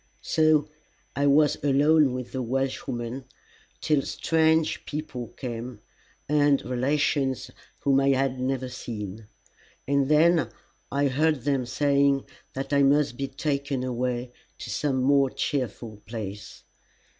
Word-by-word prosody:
So 155 -2 +3 0.5
I 140 +1 +2
was 145 0 +3
alone 145 -1 +4
with 125 -1 -6
the 130 - -3
Welshwoman 125 0 -3 0.6
till 150 -3 +2
strange 160 +2 +1
people 145 -5 -5
came, 120 -3 -6 0.5
and 145 -1 +3
relations 130 0 0 0.3
whom 135 -1 +3
I 135 0 +2
had 135 -1 +1
never 130 0 -1
seen; 110 -4 -7 0.6
and 140 0 +1
then 160 +2 +4 0.4
I 140 +1 +1
heard 150 +1 +1
them 135 -3 0
saying 140 +1 +2 0.3
that 135 +2 -4
I 140 - +4
must 140 -2 +3
be 135 +2 -3
taken 140 -2 -2
away 125 0 -2 0.3
to - - -7
some 135 -3 0
more 140 0 +4
cheerful 120 -6 -3
place. 105 -3 -7
135 Hz, 120 wpm, -26 LUFS, 125-145 Hz, 0.6 s, alone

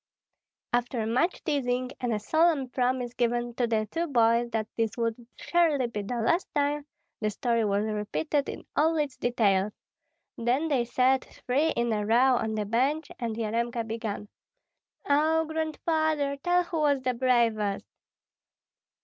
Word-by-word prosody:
After 240 -1 0
much 250 +11 0
teasing 255 -4 -1
and 245 -1 -1
a 215 - +1
solemn 310 +4 +2
promise 250 -1 -1
given 240 0 0
to 240 0 0
the 220 -2 0
two 335 +1 -1
boys 235 -3 +3
that 220 -2 -2
this 225 -1 -1
would 230 0 -2
surely 320 -7 +2
be 230 -3 -4
the 205 +5 -4
last 240 +11 +1
time, 290 0 0 0.3
the 215 - 0
story 230 +2 0
was 205 +1 +1
repeated 220 +8 -1
in - - -7
all 320 +2 +3
its 290 -3 -1
details; 210 -4 +1 0.7
then 255 +7 +1
they 260 -5 +1
sat 255 +2 +2
three 285 +6 -1
in 235 -1 0
a 210 -1 -1
row 245 +5 +4
on 220 -1 -2
the 210 -1 -1
bench 270 +8 0
and 230 -3 -2
Yaremka 230 +1 -1
began, 220 -2 -4 0.8
"Oh, 315 +3 +3
Grandfather, 315 -2 0
tell 355 +5 +2
who 340 -2 -3
was 285 -3 +2
the 255 -1 +1
bravest." 235 -5 +1
245 Hz, 150 wpm, -28 LUFS, 225-290 Hz, 0.8 s, row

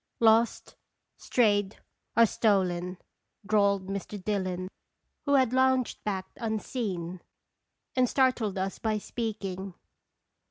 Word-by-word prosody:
"Lost, 225 +1 +3 0.4
strayed, 205 -4 +1 0.4
or 230 - +8
stolen," 185 -5 +1 0.5
drawled 200 -2 +2
Mr. 200 +1 -5
Dillon, 185 -2 -2 0.6
who 285 - +4
had 260 -3 +3
lounged 260 -1 +2
back 195 -3 -2
unseen, 205 -6 -3 0.7
and 255 -2 +3
startled 255 -7 +2
us 190 +1 -2
by 220 -1 0
speaking. 195 -4 -4
205 Hz, 95 wpm, -28 LUFS, 190-230 Hz, 0.7 s, or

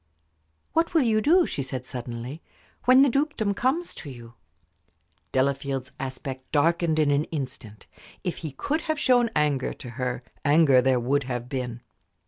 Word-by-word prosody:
"What 330 +1 +1
will 315 - +5
you 220 -2 +2
do," 340 +7 +5
she - - -3
said, 130 -1 -5
suddenly, 125 +3 -6 0.4
"when 255 +2 +7
the - - +5
dukedom 275 -6 0
comes 275 - 0
to 145 - -9
you?" 120 -3 -11 1.0
Delafield's 135 -1 -1
aspect 130 0 -6
darkened 165 +1 +2
in 150 -2 +3
an 145 +2 +2
instant. 130 -8 -7 0.4
If 180 -3 -2
he 160 - -5
could 285 - -2
have 315 -2 -2
shown 245 -5 +4
anger 145 -3 +1
to 125 - -10
her, 125 0 -3 0.2
anger 145 -3 +5
there 130 0 +3
would 135 +3 0
have 125 -2 -4
been. 125 -3 -4
140 Hz, 155 wpm, -26 LUFS, 130-215 Hz, 1.0 s, when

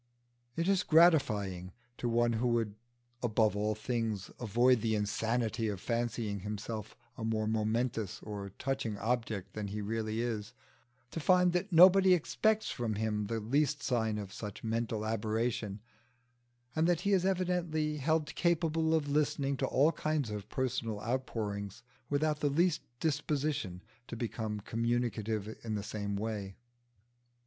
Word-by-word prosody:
It 165 +1 0
is 195 -2 +3
gratifying 105 - +3 0.3
to 120 - -1
one 120 0 +2
who 115 +2 +1
would 115 -3 +1 0.5
above 110 -3 +2
all 105 +1 0
things 110 -3 -2
avoid 120 +1 +3
the 110 0 +1
insanity 110 +2 0
of 100 -3 -3
fancying 115 -2 -2
himself 105 +2 -5 0.2
a - - -4
more 110 -1 0
momentous 110 0 -1
or 100 -2 -5
touching 130 -6 -2
object 110 -4 -2
than 105 -1 -4
he 105 +2 -4
really 110 +1 -2
is, 110 -3 -2 0.6
to - - -4
find 180 +2 +4
that 180 +3 -1
nobody 185 +2 +8
expects 215 +6 +1
from 115 -3 -2
him 105 -1 -1
the 115 +1 -1
least 145 +6 +1
sign 110 -4 0
of 100 -2 -6
such 105 -3 -7
mental 115 -1 -1
aberration, 110 -1 -1 0.9
and 160 +1 +3
that 175 -1 +2
he 200 +2 +2
is 185 -2 +3
evidently 175 -5 0
held 155 +2 0
capable 165 -2 +2
of 155 -2 0
listening 145 -1 +1
to - - 0
all 145 +5 +4
kinds 150 -6 -1
of 105 -1 -6
personal 115 -5 -2
outpouring 110 -5 -2 0.4
without 150 +1 +1
the 145 - +1
least 170 +3 +2 0.2
disposition 145 - -1 0.2
to - - -6
become 110 -2 -3
communicative 110 -2 -1
in 110 -2 -2
the 100 - -3
same 100 -1 -3
way. 100 -2 -3
115 Hz, 145 wpm, -32 LUFS, 105-150 Hz, 0.9 s, nobody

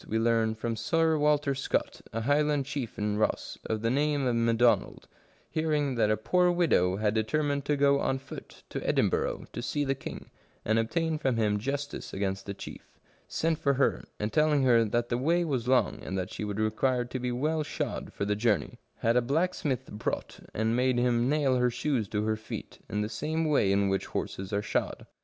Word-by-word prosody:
we 110 - 0
learn 115 -1 +2
from 115 +1 -3
Sir 165 +6 +2
Walter 150 -2 +2
Scott, 135 0 -2
a 115 - -2
Highland 145 +2 +2
chief 135 -5 -4
in 105 0 -1
Ross, 110 - -1
of 110 0 -2
the 115 - +2
name 145 0 +1
of 125 -2 +1
McDonald, 115 +1 +2 0.4
hearing 150 -3 0
that 115 -3 +2
a 110 - +2
poor 180 +11 +2
widow 165 - +3
had 105 0 +1
deter 110 +8 0
mined 140 -1 -1
to 145 - +1
go 140 0 +4
on 135 - 0
foot 135 - -11
to - - -3
Edinburgh - - +1
to 120 - -4
see 145 +4 -1
the 135 - +1
king, 135 - -8 0.3
and 110 +1 +2
obtain 160 +7 0
from 130 -5 0
him 105 -2 +1
justice 140 +5 -4
against 95 0 -2
the 100 - -4
chief, - - -11 0.3
sent 160 -1 0
for 140 -1 +2
her, 135 - +1 0.2
and 105 +1 -2
telling 150 -2 +3
her 120 -3 +5
that 120 +2 -1
the 120 - 0
way 170 +6 +2
was 130 -6 -2
long, 125 -5 +2
and 95 - -4
that 90 -1 -3
she - - -4
would 105 0 -3
require 120 +3 +1
to 125 +1 -5
be 125 0 -2
well 155 +6 0
shod 150 - -4
for 100 - -3
the 105 0 +1
journey, 105 - 0 0.2
had 115 +1 +2
a 125 - +5
blacksmith 145 0 0
brought, 105 - -4
and 110 +1 0
made 125 0 +2
him 120 0 +2
nail 140 -3 +2
her 125 0 +3
shoes 120 -3 -1
to 105 +1 -1
her 110 0 +1
feet, 110 - -8
in 105 - -1
the 105 - -1
same 155 +9 -2
way 145 -10 +3
in 100 0 +3
which 95 0 -1
horses 95 +1 -4
are 100 0 0
shod. - - -2
125 Hz, 205 wpm, -29 LUFS, 110-145 Hz, 0.4 s, her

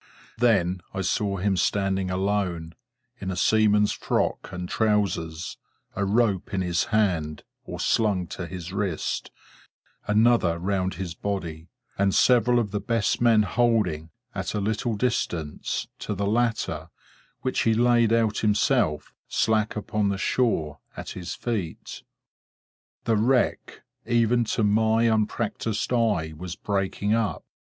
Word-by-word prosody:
Then 95 -7 +2
I 95 - -1
saw 100 +1 0
him 95 +1 +1
standing 95 0 0
alone, 90 -4 -1 0.5
in 95 - -4
a 95 - -2
seaman's 105 +1 +3
frock - - -1
and 90 0 -5
trousers: 95 -7 -1 0.4
a 100 - 0
rope 100 -2 +1
in 95 - 0
his 90 -1 0
hand, 85 -9 0 0.2
or - - -7
slung 105 -5 +1
to 85 -1 -5
his 90 0 -7
wrist: 100 -5 -2 0.8
another 105 -5 +3
round 95 0 -1
his 90 -1 -5
body: 85 -4 -4 0.3
and 100 -1 +2
several 125 -1 +4
of 110 -4 0
the 105 - -1
best 115 +1 0
men 115 -3 +5
holding, 105 -7 +1 0.2
at - - -3
a - - 0
little 110 +3 -1
distance, 90 -10 -2
to 105 - -3
the 100 +1 -1
latter, 105 -8 0 0.5
which 130 - -1
he 115 -1 +3
laid 120 -1 +4
out 115 -2 +2
himself, 105 - +1
slack 110 -1 +1
upon 105 -1 -1
the 100 - -1
shore, 95 - 0 0.2
at - - -6
his 90 -1 -6
feet. 105 -9 -4 1.0
The 115 -2 +2
wreck, 125 +4 +1 0.2
even 120 0 +3
to 110 - 0
my 110 +2 +3
unpractised 110 0 0
eye, 105 -10 +1
was 90 +2 -6
breaking 100 +1 -1
up. 110 -8 -1
105 Hz, 135 wpm, -25 LUFS, 90-115 Hz, 1.0 s, men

